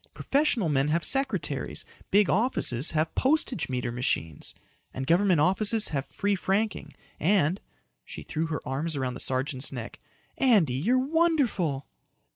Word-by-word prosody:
Professional 275 - +1
men 140 -2 +1
have 160 +2 0
secretaries. 270 - -1 0.2
Big 205 -1 +4
offices 180 - +1
have 155 0 -1
postage 265 - +1
meter 125 -1 -2
machines. 100 - -2 0.4
And 130 - -3
government 175 +2 +3
offices 205 +6 +3
have 140 -3 -3
free 205 0 -1
franking. 200 +3 -2 0.2
And" 180 0 +2 0.4
she - - -9
threw 160 0 -3
her 155 -2 -5
arms 145 +5 -2
around 130 -2 -2
the 125 - -8
sergeant's 130 +1 -2
neck 120 -3 -7 0.4
"Andy, 210 - +4
you're 195 - +1
wonderful." 260 - +1
165 Hz, 135 wpm, -27 LUFS, 135-220 Hz, 0.4 s, Big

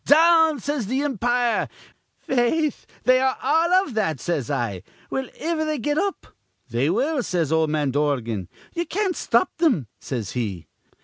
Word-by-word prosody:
'Down!' 320 0 +5
says 280 -3 -2
th' 245 - -3
impire. 245 -3 +1 0.5
'Faith, 265 +4 0 0.2
they 255 0 +5
are 265 0 +1
all 340 +5 +3
iv 270 - -8
that,' 160 - 0
says 145 -4 -2
I. 100 -7 -2 0.3
'Will 265 -2 -2
iver 320 0 -1
they 310 -1 -1
get 290 +4 0
up?' 395 0 -2 0.5
'They 120 +5 +1
will,' 270 - +1
says 170 - -1
ol' 160 0 +3
man 150 -2 0
Dorgan. 125 - -1 0.2
'Ye 345 0 -2
can't 385 -1 -1
stop - - +2
thim,' 275 - +3
says 115 -7 -4
he. 100 -9 -3
245 Hz, 160 wpm, -23 LUFS, -, 0.5 s, Down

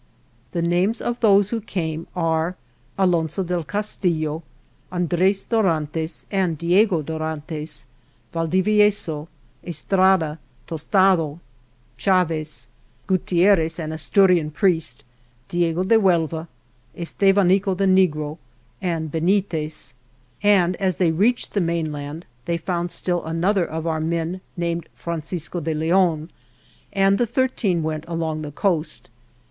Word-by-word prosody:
The 170 -2 0
names 180 +6 +1
of 240 0 -3
those 205 -2 +4
who 230 -1 -1
came 165 -5 -4
are: 165 0 0 0.4
Alonso 175 -2 +1
del 175 -1 -2
Castillo, 170 -5 -1 0.5
Andres 180 +2 +1
Dorantes 160 -7 0
and 185 -5 0
Diego 175 +1 +3
Dorantes, 155 0 -4 0.5
Valdivieso, 185 -2 +2 0.4
Estrada, 175 -1 +2 0.3
Tostado, 165 -1 +2 0.6
Chaves, 160 -7 +1 0.4
Gutierrez, 175 -2 +2
an 155 -2 -4
Asturian 170 +1 +3
priest; 160 - 0 0.5
Diego 175 0 +1
de 225 +4 +4
Huelva, 165 -4 +1 0.5
Estevanico, 195 +1 +2
the 195 - +2
negro 160 -5 +2 0.4
Benitez, 160 -3 -1 0.5
and 185 -4 +4
as 190 -3 0
they 175 -3 +2
reached 215 +9 +1
the 200 - +1
mainland 160 -2 -3 0.2
they 170 0 0
found 175 +1 -2
still 175 0 -2
another 175 +4 +1
of 160 0 -5
our 160 -1 0
men 170 +3 -2 0.2
named 170 -1 -2
Francisco 170 +1 -4
de 160 0 -2
Leon, 165 0 +1 0.6
and 195 0 +3
the 240 - +2
thirteen 220 -8 0
went 155 -1 -3
along 165 -2 -2
the 150 -1 -6
coast. 165 - -1
170 Hz, 110 wpm, -22 LUFS, 160-190 Hz, 0.6 s, those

